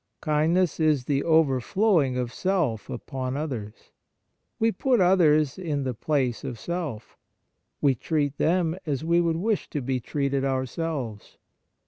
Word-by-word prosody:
Kindness 160 Hz, +3 st, +1 dB
is 155 Hz, -5 st, +2 dB
the 140 Hz, 0 st, 0 dB
overflowing 160 Hz, -, +2 dB
of 125 Hz, -1 st, -3 dB
self 170 Hz, -, -1 dB
upon 130 Hz, 0 st, -4 dB
others. 120 Hz, -9 st, -6 dB, 0.7 s
We 225 Hz, 0 st, +2 dB
put 255 Hz, 0 st, +1 dB
others 160 Hz, -5 st, +4 dB
in 150 Hz, -6 st, -2 dB
the 130 Hz, -1 st, -2 dB
place 130 Hz, -1 st, -1 dB
of 120 Hz, -, -5 dB
self. 155 Hz, -11 st, -5 dB, 0.6 s
We 140 Hz, -2 st, +4 dB
treat 145 Hz, +2 st, -2 dB
them 170 Hz, -1 st, +2 dB
as 145 Hz, 0 st, -1 dB
we 170 Hz, +1 st, +3 dB
would 165 Hz, -1 st, 0 dB
wish 210 Hz, +4 st, -1 dB
to 150 Hz, -, -3 dB
be 130 Hz, -1 st, -1 dB
treated 140 Hz, +2 st, -1 dB
ourselves. 130 Hz, -3 st, -3 dB
150 Hz, 135 wpm, -26 LUFS, 130-170 Hz, 0.7 s, others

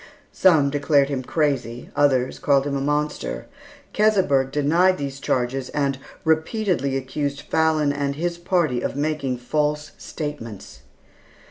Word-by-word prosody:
Some 155 Hz, -7 st, +4 dB
declared 140 Hz, -1 st, +2 dB
him 135 Hz, -2 st, -2 dB
crazy, 130 Hz, -4 st, -2 dB
others 130 Hz, -3 st, +2 dB
called 140 Hz, -1 st, +3 dB
him 140 Hz, -1 st, -2 dB
a 135 Hz, -, -1 dB
monster. 145 Hz, -, -2 dB, 0.5 s
Keseberg 190 Hz, -11 st, +3 dB
denied 170 Hz, +6 st, +3 dB
these 140 Hz, -1 st, -5 dB
charges 130 Hz, 0 st, -1 dB
and 140 Hz, -2 st, -1 dB, 0.2 s
repeatedly 160 Hz, -, +1 dB
accused 140 Hz, +2 st, -3 dB
Fallon 155 Hz, -2 st, +1 dB
and 140 Hz, -1 st, -2 dB
his 170 Hz, +2 st, -2 dB
party 170 Hz, -8 st, +1 dB
of -, -, -3 dB
making 145 Hz, -3 st, -1 dB
false 150 Hz, +4 st, -1 dB
statements. 145 Hz, -9 st, -7 dB
145 Hz, 125 wpm, -23 LUFS, 135-155 Hz, 0.5 s, Some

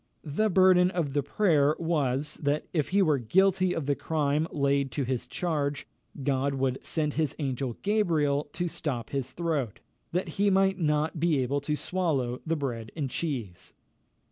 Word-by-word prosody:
The 170 Hz, +9 st, 0 dB
burden 185 Hz, -1 st, +5 dB
of 170 Hz, -7 st, -2 dB
the 145 Hz, -, +2 dB
prayer 150 Hz, -1 st, +2 dB
was, 150 Hz, -4 st, 0 dB
that 145 Hz, +1 st, 0 dB
if 155 Hz, -5 st, 0 dB
he 200 Hz, +1 st, +3 dB
were 150 Hz, -5 st, +2 dB
guilty 185 Hz, -, +2 dB
of 160 Hz, -, -2 dB
the 145 Hz, -, +2 dB
crime 150 Hz, +1 st, 0 dB
laid 140 Hz, -1 st, +1 dB
to 140 Hz, -, -1 dB
his 125 Hz, -1 st, -2 dB
charge, 145 Hz, -5 st, -2 dB, 0.4 s
God 140 Hz, 0 st, +1 dB
would 130 Hz, -1 st, -1 dB
send 150 Hz, -3 st, -1 dB
his 155 Hz, -4 st, -1 dB
angel 130 Hz, -4 st, -3 dB
Gabriel 160 Hz, -9 st, +1 dB
to 175 Hz, -, -2 dB
stop 130 Hz, -8 st, -4 dB
his 135 Hz, -2 st, -3 dB
throat, 155 Hz, -, -2 dB, 0.3 s
that 180 Hz, +2 st, -1 dB
he 205 Hz, 0 st, +4 dB
might 195 Hz, 0 st, +3 dB
not 155 Hz, 0 st, 0 dB
be 165 Hz, -2 st, +2 dB
able 135 Hz, +2 st, 0 dB
to 150 Hz, +2 st, -1 dB
swallow 145 Hz, -9 st, -1 dB
the 165 Hz, -, +1 dB
bread 120 Hz, -7 st, -4 dB
and 140 Hz, -5 st, -3 dB
cheese. 115 Hz, -, -4 dB
150 Hz, 170 wpm, -28 LUFS, 135-170 Hz, 0.4 s, burden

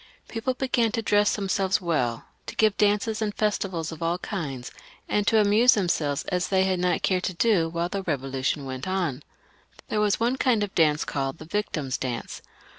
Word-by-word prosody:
People 245 Hz, +3 st, -2 dB
began 245 Hz, -4 st, +1 dB
to 230 Hz, -2 st, -1 dB
dress 205 Hz, -1 st, +3 dB
themselves 195 Hz, -1 st, 0 dB
well, 130 Hz, -, -1 dB, 0.2 s
to -, -, -6 dB
give 215 Hz, -2 st, +3 dB
dances 210 Hz, +1 st, +1 dB
and 210 Hz, -1 st, -1 dB
festivals 190 Hz, -6 st, -1 dB
of 160 Hz, -, -9 dB
all 165 Hz, +1 st, 0 dB
kinds, 150 Hz, -, -5 dB, 0.4 s
and 205 Hz, -1 st, 0 dB
to 225 Hz, -, +4 dB
amuse 215 Hz, +4 st, +5 dB
themselves 160 Hz, -8 st, 0 dB
as 180 Hz, -1 st, 0 dB
they 190 Hz, -1 st, +3 dB
had 190 Hz, -1 st, 0 dB
not 180 Hz, 0 st, 0 dB
cared 185 Hz, -1 st, +2 dB
to 185 Hz, -, -3 dB
do 180 Hz, -5 st, +2 dB
while 170 Hz, +1 st, -1 dB
the 195 Hz, +2 st, -4 dB
Eevolu 135 Hz, -5 st, -3 dB
tion 140 Hz, +1 st, 0 dB
went 130 Hz, +2 st, -5 dB
on. 175 Hz, -8 st, -1 dB, 0.7 s
There 210 Hz, -, 0 dB
was 210 Hz, -1 st, +2 dB
one 240 Hz, +3 st, +1 dB
kind 240 Hz, -5 st, +2 dB
of 205 Hz, -, -4 dB
dance 155 Hz, -2 st, +3 dB
called 135 Hz, +1 st, -3 dB
the 155 Hz, -, -10 dB
Victim's 155 Hz, -8 st, -2 dB
Dance. 125 Hz, -3 st, -4 dB
185 Hz, 190 wpm, -26 LUFS, 155-210 Hz, 0.7 s, amuse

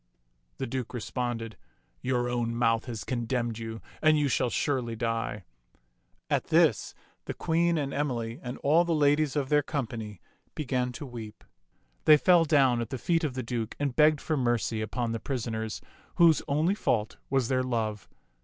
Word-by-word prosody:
The -, -, -2 dB
Duke 125 Hz, 0 st, -4 dB
responded, 115 Hz, -3 st, -3 dB, 0.2 s
" -, -, -41 dB
Your 125 Hz, -1 st, 0 dB
own 120 Hz, -1 st, -1 dB
mouth 115 Hz, -1 st, +2 dB
has 115 Hz, -5 st, -5 dB
con 120 Hz, -2 st, -2 dB
demned 120 Hz, -2 st, -2 dB
you, 115 Hz, 0 st, -6 dB, 0.2 s
and 155 Hz, 0 st, +5 dB
you 145 Hz, -1 st, +1 dB
shall 125 Hz, -, +1 dB
surely 125 Hz, -3 st, -1 dB
die." 115 Hz, -3 st, -2 dB, 0.8 s
At -, -, 0 dB
this -, -, +2 dB, 0.3 s
the -, -, -5 dB
Queen 170 Hz, +1 st, +1 dB
and 140 Hz, -2 st, -2 dB
Emily 120 Hz, -4 st, -2 dB
and 125 Hz, 0 st, -6 dB
all 160 Hz, +5 st, +5 dB
the 170 Hz, -1 st, 0 dB
ladies 145 Hz, 0 st, +2 dB
of 140 Hz, -3 st, -1 dB
their 150 Hz, 0 st, +4 dB
company 115 Hz, -, -4 dB, 0.4 s
began 125 Hz, -4 st, -1 dB
to 145 Hz, -, -7 dB
weep. 115 Hz, -4 st, -9 dB, 0.6 s
They 155 Hz, -, +8 dB
fell 175 Hz, +1 st, +5 dB
down 135 Hz, -6 st, +3 dB
at 115 Hz, -, -4 dB
the 130 Hz, -, -3 dB
feet 165 Hz, +6 st, 0 dB
of 140 Hz, -5 st, -2 dB
the 130 Hz, -, -3 dB
Duke 115 Hz, -2 st, -3 dB
and 140 Hz, -3 st, -1 dB
begged 150 Hz, -1 st, +4 dB
for 155 Hz, -, -1 dB
mercy 120 Hz, -4 st, 0 dB
upon 115 Hz, +2 st, -2 dB
the 115 Hz, -, -2 dB
pris 130 Hz, -3 st, -3 dB
oners, 110 Hz, -2 st, -4 dB, 0.3 s
whose 165 Hz, -3 st, +5 dB
only 155 Hz, +6 st, +2 dB
fault 115 Hz, -, -1 dB
was 135 Hz, -3 st, +1 dB
their 130 Hz, 0 st, +1 dB
love. 110 Hz, -6 st, -2 dB
125 Hz, 180 wpm, -28 LUFS, 115-145 Hz, 0.8 s, They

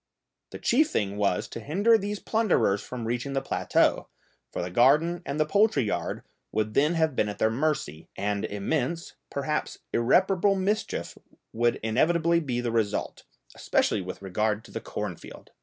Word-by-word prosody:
The -, -, -8 dB
chief 295 Hz, +6 st, +3 dB
thing 100 Hz, -1 st, -1 dB
was 100 Hz, -3 st, 0 dB
to -, -, -6 dB
hinder 195 Hz, -, +3 dB
these 205 Hz, -1 st, -1 dB
plunderers 210 Hz, -, +1 dB
from 125 Hz, -2 st, -6 dB
reaching 120 Hz, +4 st, -2 dB
the 135 Hz, -, +1 dB
plateau, -, -, +1 dB, 0.4 s
for -, -, -3 dB
the 90 Hz, -, -5 dB
garden 150 Hz, -, +4 dB
and 140 Hz, +2 st, -3 dB
the 155 Hz, -, +3 dB
poultry 200 Hz, -, +3 dB
yard 105 Hz, -, -3 dB, 0.3 s
would 110 Hz, 0 st, -1 dB
then 150 Hz, +7 st, +3 dB
have 160 Hz, -4 st, +1 dB
been 105 Hz, -, +1 dB
at 105 Hz, -, -6 dB
their 110 Hz, -, +2 dB
mercy, 120 Hz, -, -2 dB
and 100 Hz, 0 st, -1 dB
immense, 140 Hz, +10 st, -2 dB, 0.2 s
perhaps 150 Hz, +2 st, -2 dB, 0.2 s
irreparable 190 Hz, -, +3 dB
mischief, 200 Hz, +3 st, -2 dB, 0.3 s
would 120 Hz, +1 st, +2 dB
inevitably 165 Hz, +9 st, +2 dB
be 125 Hz, -6 st, -2 dB
the 120 Hz, -1 st, -2 dB
result, 110 Hz, -3 st, -1 dB, 0.3 s
especially 105 Hz, -, +1 dB
with 95 Hz, +1 st, -7 dB
regard 105 Hz, +3 st, -1 dB
to -, -, -14 dB
the -, -, -5 dB
cornfield. -, -, -7 dB
135 Hz, 160 wpm, -27 LUFS, 110-170 Hz, 0.4 s, garden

